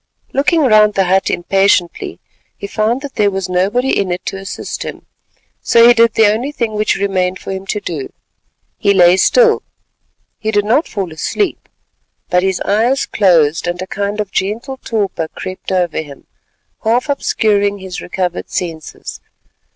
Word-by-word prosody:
Looking 300 +4 +2
round 215 -5 +4
the 195 - +3
hut 190 +1 +2
impatiently, 195 -1 +1 0.4
he - - -7
found 215 +5 -1
that 285 -1 -7
there 205 -1 +3
was 195 -1 -3
nobody 200 +9 +1
in 190 -2 0
it 180 +1 -4
to - - -4
assist 195 0 -6
him, - - -7 0.6
so 235 0 +5
he 240 - +8
did 230 -1 +3
the 220 - +5
only 225 +7 +1
thing 235 -6 -2
which 210 0 +1
remained 185 -2 0
for - - -7
him 190 0 -6
to 210 - -1
do—he 175 +4 -5
lay 175 -1 +6
still. 460 - +4 0.8
He 220 - -2
did 205 -1 +1
not 255 +9 +2
fall 190 -6 -4
asleep, 360 - -2 0.6
but 180 - +4
his 190 0 0
eyes 235 +7 +1
closed, 170 -5 +2
and 175 +1 -2
a 185 - -4
kind 200 +2 -3
of 205 -2 -3
gentle 225 +9 -2
torpor 205 -9 -2
crept 185 +3 -7
over 180 -3 0
him, 145 -3 -12 0.6
half 240 +6 +1
obscuring 205 -7 +1
his 190 -2 -7
recovered 180 -1 -3
senses. 165 -4 -6
200 Hz, 160 wpm, -16 LUFS, 185-225 Hz, 0.8 s, he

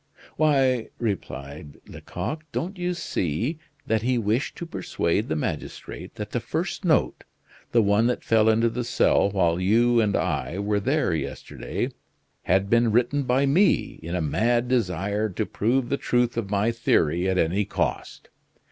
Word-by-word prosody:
"Why," 135 -6 +2
replied 75 - -5
Lecoq, 120 - -6
"don't 185 +4 -3
you 180 0 -1
see 115 - -2 0.3
that 110 -1 +1
he 125 +2 +1
wished 115 +4 0
to 170 - -6
persuade 105 - -1
the 80 - 0
magistrate 75 - -5
that - - -6
the - - -1
first - - -3
note, - - +1 0.5
the 115 -2 +4
one 100 +3 +3
that 125 - -1
fell 110 -1 +3
into 115 +1 +3
the 120 +2 -2
cell 115 -3 +2
while 85 -4 +1
you 115 +5 +3
and 105 -2 +1
I 70 +2 -1
were 100 +1 0
there 135 - +1
yesterday, 80 - -4 0.5
had 95 +1 +2
been 115 +1 +3
written 130 +5 +1
by 130 +3 +2
me 175 +9 +2
in 85 +2 -4
a 90 - 0
mad 120 - +1
desire 105 -2 0
to 105 +3 -2
prove 120 +5 0
the 140 - 0
truth 120 -1 +1
of 115 -4 -3
my 105 +3 +1
theory 90 -6 +1
at 95 - 0
any 90 +5 +2
cost? - - -3
110 Hz, 160 wpm, -25 LUFS, 95-125 Hz, 0.5 s, the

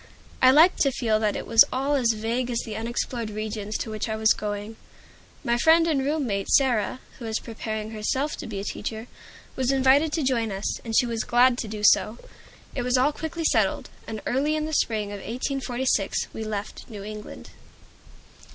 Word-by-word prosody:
I 255 - +7
liked 315 +7 +6
to 275 - +3
feel 225 -4 0
that 210 -2 0
it - - -4
was 225 - +7
all 270 +3 0
as 245 -5 +2
vague 230 +3 -2
as 235 -1 -1
the 220 - -6
unexplored 230 0 -3
regions 215 0 -4
to 225 - -5
which 215 +1 -3
I 220 - -1
was 220 0 +4
going. 210 +1 -5 0.7
My 235 0 +1
friend 330 +4 +5
and 295 -5 +1
room 295 +1 0
mate 200 -4 -2
Sarah, 250 -3 +2 0.2
who 240 - -7
was 220 -1 -1
preparing 220 -1 -5
herself 260 +7 -1
to - - -7
be 205 -3 -5
a - - -4
teacher, 220 +2 -5 0.5
was 260 0 +1
invited 270 +3 +4
to 320 - 0
join 235 -5 0
us, 195 +1 -3
and 225 -2 -2
she - - +5
was 230 -2 -2
glad 250 0 +4
to 225 - -3
do 210 0 -6
so. 215 +2 +4 0.6
It 250 - -2
was 250 +1 +1
all 265 +4 +3
quickly 320 +2 -5
settled, 215 -9 +1 0.2
and 220 -1 -6
early 285 +5 +1
in 305 0 -1
the 315 - -5
spring 215 -7 0
of 205 - -5
1846 250 -1 -1
we 220 - -5
left 210 +1 -6
New 205 -3 -8
England. 210 0 -9
230 Hz, 195 wpm, -25 LUFS, 215-265 Hz, 0.7 s, I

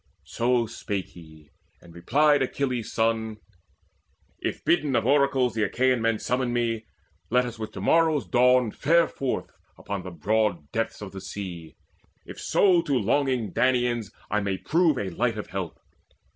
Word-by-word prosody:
So 120 0 +1
spake 100 -3 -4
he, 80 -3 -16 0.3
and 85 -1 -16
replied 145 - +3
Achilles' 130 -3 -2
son: 110 -1 0 1.0
"If - - -4
bidden 150 -6 +2
of - - +1
oracles 135 -2 +3
the 110 - -2
Achaean 125 +3 +1
men 115 -1 +1
Summon 125 +2 -1
me, 115 -2 -1 0.4
let 125 +2 +3
us 120 -2 -7
with 110 - -5
to 95 - -7
morrow's 160 +3 +3
dawn 125 -2 +3
Fare 165 +7 +3
forth 135 -2 -3 0.3
upon 100 -2 -5
the 95 - -7
broad 90 -2 -1
depths 115 -1 -3
of 100 - -8
the 95 0 -8
sea, 85 -4 -7 0.5
If - - -10
so 185 -4 +3
to 145 -5 0
longing 125 -2 0
Danaans 120 -3 +1 0.2
I 105 - +2
may 100 -2 -2
prove 160 - +2
A 100 -4 -3
light 115 +5 -1
of 105 - -7
help. 95 -4 -4
115 Hz, 160 wpm, -26 LUFS, 100-130 Hz, 1.0 s, replied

